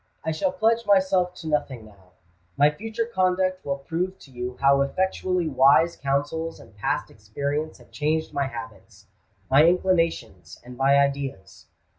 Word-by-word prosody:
I 160 - 0
shall 265 - 0
pledge 230 -3 +1
myself 190 -2 +2
to 165 - -9
nothing 135 -6 -2
now: 95 -4 -20 0.4
my 145 +1 +5
future 225 +7 -4
conduct 185 -3 0
will 140 0 -2
prove 170 +7 -3
to 135 - -15
you 125 0 -6
how 140 0 +4
effectually 185 +3 -1
wise 140 +4 +4
counsels 145 +4 -2
and - - -16
past 100 - -2
experience 140 +9 -4
have - - -20
changed 155 +1 -1
my 140 -1 0
habits, 110 -4 -10 0.5
my 140 +3 +7
inclinations, 175 -2 0
and 125 0 -10
my 135 +2 +3
ideas. 140 -9 -2
150 Hz, 150 wpm, -24 LUFS, 135-180 Hz, 0.5 s, my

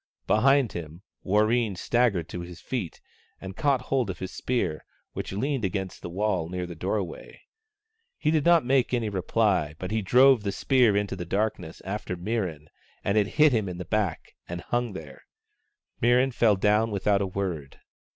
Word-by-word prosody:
Behind 135 +2 +3
him, 85 +2 -8 0.2
Warreen 110 +1 +2
staggered 100 -4 +1
to 90 - -5
his 85 0 -9
feet 115 -11 -4 0.4
and 95 0 -8
caught 140 0 +1
hold 130 -6 -1
of 95 - -4
his 95 -1 -6
spear, 95 -11 -2 0.3
which - - -5
leaned 130 +5 -1
against 95 0 -3
the - - -6
wall 95 -3 -1
near 90 0 -3
the 85 - -7
doorway. 95 +2 -4 0.8
He 155 - +1
did 155 -2 +2
not 170 -4 +5
make 130 -1 +2
any 115 -3 -1
reply, 95 -5 0
but 90 +3 -5
he 110 0 0
drove 125 +4 +5
the 100 -1 -2
spear 120 0 +3
into 100 -1 -1
the 90 - -5
darkness 95 -2 -2
after 95 -2 -4
Mirran, 90 -6 -3 0.3
and 100 - 0
it 105 -2 +3
hit 155 -1 +6
him 110 -6 0
in 90 - -6
the 90 - -6
back 95 -2 -2 0.2
and 85 0 -5
hung 120 0 -2
there. 75 -7 -9 0.8
Mirran 125 +3 +4
fell 110 -3 +4
down 105 +3 +2
without 100 -1 +1
a 100 - 0
word. 90 -7 -4
100 Hz, 175 wpm, -26 LUFS, 90-120 Hz, 0.8 s, hit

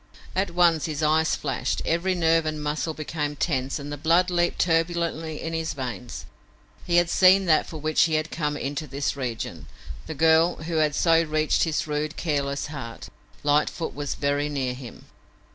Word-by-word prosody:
At 190 +1 +1
once 170 -3 +3
his 155 -1 -3
eyes 160 +1 +3
flashed, 135 -4 -2
every 180 +3 +1
nerve 165 -2 +2
and 155 -1 -2
muscle 150 +2 -2
became 150 -1 -3
tense 135 -3 -1
and 145 0 -7
the 145 - -4
blood 170 +5 +3
leaped 175 0 +1
turbulently 165 -2 0
in 165 - -4
his 160 0 -2
veins. 125 -2 -6 0.6
He 175 - +1
had 175 0 +5
seen 190 +2 +5
that 155 -3 +3
for 160 - -7
which 155 +1 +2
he 160 -2 0
had 155 +1 -1
come 150 -2 -2
into 145 +3 -4
this 140 +2 -2
region, 125 -5 -5 0.4
the 160 - -5
girl 160 +3 +4
who 165 0 -2
had 155 -2 +2
so 165 0 +4
reached 155 0 +1
his 160 -2 -1
rude, 150 0 -3
careless 140 -3 -1
heart. 130 -6 -8 0.3
Lightfoot 150 +3 +1
was 145 0 -4
very 145 +1 0
near 135 -3 -2
him! 125 -2 -11
155 Hz, 180 wpm, -25 LUFS, 145-165 Hz, 0.6 s, had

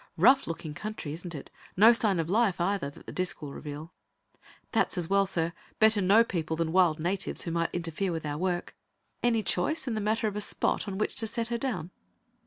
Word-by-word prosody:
"Rough 270 +1 +5
looking 160 -2 -5
country, 175 -4 -5
isn't 170 +1 -7
it? 140 - -9 0.3
No 225 +5 +8
sign 210 -6 +2
of 160 - -1
life, 205 0 +2
either, 185 -4 0
that 145 - -15
the - - -7
disc 185 0 -2
will 145 -2 -7
reveal." 150 +2 -8 0.8
"That's - - +1
as 175 0 -3
well, 195 0 +4
sir. 165 -2 -1 0.2
Better 220 -1 +5
no 200 +5 +6
people 160 -7 -3
than 165 0 -1
wild 175 -3 +3
natives 180 +4 -1
who 170 - -4
might 170 0 0
interfere 175 +2 -2
with 160 -2 -4
our 145 0 -3
work. 180 -1 -2 0.5
Any 230 -2 +2
choice 270 - 0
in 240 - -1
the 215 - -2
matter 220 +2 0
of 205 - -3
a 210 - -2
spot 210 - 0
on 195 -1 -4
which 215 - -1
to 225 - 0
set 230 +1 -2
her 235 - -1
down?" 185 -10 -3
185 Hz, 215 wpm, -29 LUFS, 165-215 Hz, 0.8 s, No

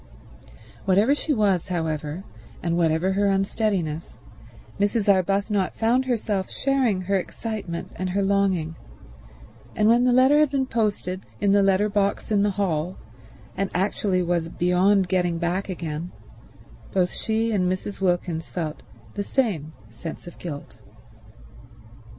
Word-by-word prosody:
Whatever 200 +8 +4
she 295 +1 -2
was, 205 - +2
however, 160 -1 -3 0.4
and 170 -1 0
whatever 170 +2 +2
her 200 +1 +2
unsteadiness, 195 - -1 0.6
Mrs. 205 +1 +1
Arbuthnot 195 0 +2
found 240 +4 +2
herself 215 -6 -1
sharing 260 -8 +1
her 195 +2 +1
excitement 195 -3 -5
and 185 0 -2
her 195 +2 0
longing; 190 -5 +1 1.0
and 210 - +3
when 235 +2 +5
the 250 - +4
letter 260 +4 +5
had 305 -2 +4
been 270 -1 0
posted 205 -6 -2
in 200 -1 +2
the 200 0 +5
letter 195 +1 +3
box 200 0 0
in 205 -1 +3
the 205 - +3
hall 180 -3 -1 0.6
and 195 0 -1
actually 185 0 +1
was 170 -1 0
beyond 180 +3 +3
getting 175 -2 +1
back 175 +4 -1
again, 165 -1 -4 0.8
both 180 -2 +1
she 225 +1 0
and 185 -4 +1
Mrs. 195 +2 -4
Wilkins 175 -3 0
felt 155 -4 -4 0.3
the - - -3
same 200 - -1 0.2
sense 115 +9 -8
of 175 - -11
guilt. 145 -5 -7
195 Hz, 135 wpm, -24 LUFS, 175-210 Hz, 1.0 s, when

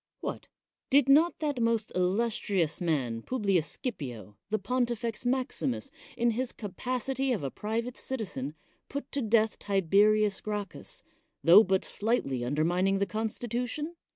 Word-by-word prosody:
What? - - -5 0.4
Did 280 -1 +5
not 310 +5 +5
that 290 -5 -1
most 230 -2 +1
illustrious 185 -3 0
mar 150 -8 +1
Publius 200 -10 +1 0.2
Scipio, 125 - -5
the 215 - +1
Pontifex 235 +1 -1
Maximus, 260 +1 -1 0.3
in 235 0 +3
hi 240 +3 0
capacity 255 +6 -2
of 215 -11 -1
a 135 - -2
private 230 +3 -3
citizen, 175 - -4 0.3
put 280 0 -5
to 280 - 0
death 220 -1 +2
Tib( 195 -5 -1
rius 210 0 +4
Gracchus, 210 - -5 0.4
tho 180 +6 +9
but 190 -1 +1
slightly 205 - 0
undermining 175 +9 +1
th 200 0 0
constitution 240 - -3
215 Hz, 130 wpm, -29 LUFS, 185-250 Hz, 0.4 s, tho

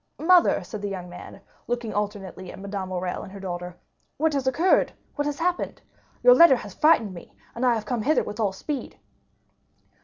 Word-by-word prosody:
"Mother," 345 - +4
said 205 +3 -7
the 205 - -3
young 180 -2 -6
man, 175 - -11 0.3
looking 240 -2 -2
alternately 200 -3 -4
at - - -11
Madame 195 -1 -5
Morrel 180 -1 -3
and - - -10
her 200 - -9
daughter, 180 -2 -6 0.4
"what 315 +1 +1
has 275 -2 -1
occurred—what 290 0 +1
has 290 -1 -2
happened? 355 +1 -1 0.4
Your - - +9
letter 335 - +8
has 205 -5 -8
frightened 265 - +3
me, 170 - -12 0.2
and 235 - -4
I 245 -2 +4
have 220 - -4
come 245 -3 -2
hither 305 +8 +2
with 210 - -7
all 205 -3 +1
speed." 270 +8 -5
215 Hz, 185 wpm, -25 LUFS, 190-290 Hz, 0.4 s, Your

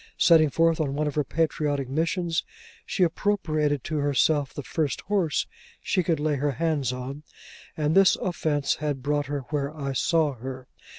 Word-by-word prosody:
Setting 160 -3 +5
forth 165 +2 +2
on 140 -3 -1
one 150 +1 0
of 150 - -2
her 150 - +1
patriotic 145 -2 -1
missions, 165 +4 -1 0.4
she 190 - +1
appropriated 155 - 0
to 155 - -3
herself 145 0 +2
the 145 - -7
first 140 +3 -2
horse 185 -7 0 0.3
she 185 - 0
could 165 -3 0
lay 150 -1 0
her 145 +1 0
hands 155 -5 0
on; 130 +3 -6 0.6
and 150 0 +1
this 195 -2 +6
offence 155 -5 -1
had 145 -3 -3
brought 145 0 0
her 145 0 -3
where 140 -1 -1
I 140 -2 -3
saw 155 +2 +2
her. 130 +1 -8
150 Hz, 170 wpm, -26 LUFS, 140-160 Hz, 0.6 s, this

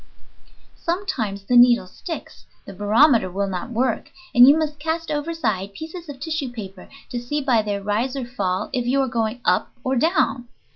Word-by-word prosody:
Sometimes 335 - -2
the 245 +5 0
needle 240 -4 +6
sticks, 325 - -8 0.2
the 200 - -9
barometer 215 +2 +4
will 200 +2 -1
not 185 +2 -4
work, 240 0 -1 0.2
and 245 +1 +8
you 290 +3 +7
must 300 -2 -2
cast 320 +1 -2
overside 250 - -2
pieces 325 - -8
of 275 -2 -8
tissue 310 -2 -3
paper 195 -5 -9 0.2
to 245 - -2
see 245 +5 -2
by 255 -5 +2
their 205 -1 -3
rise 225 +6 -1
or 265 -3 -3
fall 200 -5 -2
if 245 -2 -1
you 270 +3 +2
are 265 - 0
going 230 0 -2
up 180 - +2
or 260 +1 0
down. 255 -4 +1
245 Hz, 180 wpm, -22 LUFS, 205-295 Hz, 0.2 s, and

